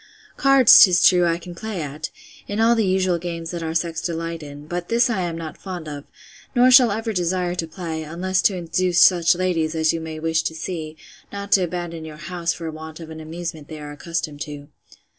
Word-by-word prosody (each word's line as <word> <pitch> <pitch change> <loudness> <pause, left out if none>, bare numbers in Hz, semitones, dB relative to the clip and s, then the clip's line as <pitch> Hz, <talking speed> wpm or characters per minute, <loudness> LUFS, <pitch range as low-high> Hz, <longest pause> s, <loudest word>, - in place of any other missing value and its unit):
Cards, 275 -4 +7
'tis 180 -3 +7
true, 180 -2 +4
I 165 0 +1
can 175 +1 -10
play 215 +1 -5
at, 150 0 -5 0.4
in 205 +1 -3
all 230 +1 +5
the 225 -4 +1
usual 185 -2 +1
games 170 -1 -5
that 170 -1 -5
our 160 0 -4
sex 165 -1 -1
delight 165 -1 -4
in; 145 0 -10
but 175 +2 -5
this 235 +2 +3
I 200 -5 -1
am 170 -2 -3
not 160 -2 -7
fond 180 -4 -7
of, 145 -1 -7 0.5
nor 250 +1 +5
shall 250 -2 +8
ever 220 +2 -2
desire 180 -1 -1
to 170 -2 -3
play, 160 -1 -5
unless 180 +4 -1
to 195 - +2
induce 175 +1 0
such 175 -1 +5
ladies, 170 -3 -1
as 160 0 +2
you 165 - -3
may 160 -1 -6
wish 160 0 +1
to 160 - -4
see, 160 -1 -5 0.3
not 200 0 -7
to 195 - +5
abandon 175 -2 -4
your 155 -1 -9
house 170 +2 -3
for 165 -1 -5
want 160 +1 -9
of 160 -1 -9
an 160 - -8
amusement 160 -1 -7
they 155 -1 -8
are 145 0 -8
accustomed 150 -1 -5
to. 145 -2 -7
170 Hz, 215 wpm, -22 LUFS, 160-185 Hz, 0.5 s, shall